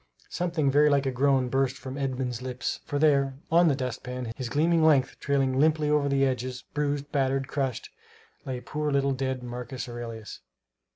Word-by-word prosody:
Something 165 -5 0
very 150 +2 +5
like 140 -1 +2
a 135 - +1
groan 130 0 +2
burst 135 +1 0
from 130 0 -7
Edmund's 130 -3 -2
lips; 125 0 -3
for, 145 - -2
there, 140 -3 +3 0.2
on 170 +1 +6
the 145 - +3
dustpan, 125 -2 -4
his 125 -3 -5
gleaming 160 +4 +2
length 145 -5 +3
trailing 135 -2 +1
limply 155 0 +3
over 145 -1 +2
the 135 0 +3
edges, 125 -1 -2
bruised, 145 -1 -1
battered, 135 -1 0
crushed, 135 -5 -3 0.5
lay 130 -2 -4
poor 150 +2 -3
little 140 0 +2
dead 130 -1 -2
Marcus 125 +2 -6
Aurelius. 115 -2 -7
135 Hz, 170 wpm, -27 LUFS, 125-145 Hz, 0.5 s, on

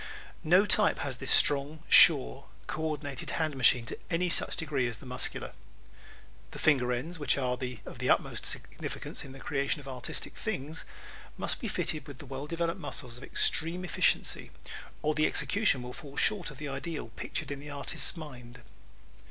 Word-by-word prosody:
No 180 +6 +5
type 210 0 +4
has 130 -3 -2
this 135 0 -3
strong, 145 +2 +4
sure, 60 0 +7 0.2
co 155 - -4
ordinated 145 -4 -3
hand 155 -3 0
machine 125 -2 +4
to - - -6
any 180 +1 +1
such - - +5
degree 145 -7 0
as 115 -3 -5
the - - -13
Muscular. 125 0 -4 1.0
The - - -10
finger 130 -6 +3
ends, 160 +8 -3
which 145 -2 +2
are 125 -2 0 0.3
of - - -9
the - - -1
utmost - - +1
significance - - -4
in 135 - -10
the 135 - -11
creation 140 +1 -1
of 140 - -12
artistic 130 -2 -4
things, 150 +5 -4 0.5
must - - -2
be - - -3
fitted 155 - -2
with 140 -2 -10
well 135 +1 -6
developed 170 +1 -2
muscles 125 -3 -5
of - - -12
extreme 170 +6 0
efficiency 175 - +1 0.5
or 155 +1 +2
the 155 0 +3
execution 200 - +1
will 125 0 -7
fall 145 -2 -11
short 205 -5 +2
of 145 - -11
the 150 0 -5
ideal 140 -1 -5
pictured 115 - -4
in 140 - -4
the 145 +1 -9
artist's 145 +5 -1
mind. 125 -6 -10
145 Hz, 175 wpm, -30 LUFS, 130-160 Hz, 1.0 s, sure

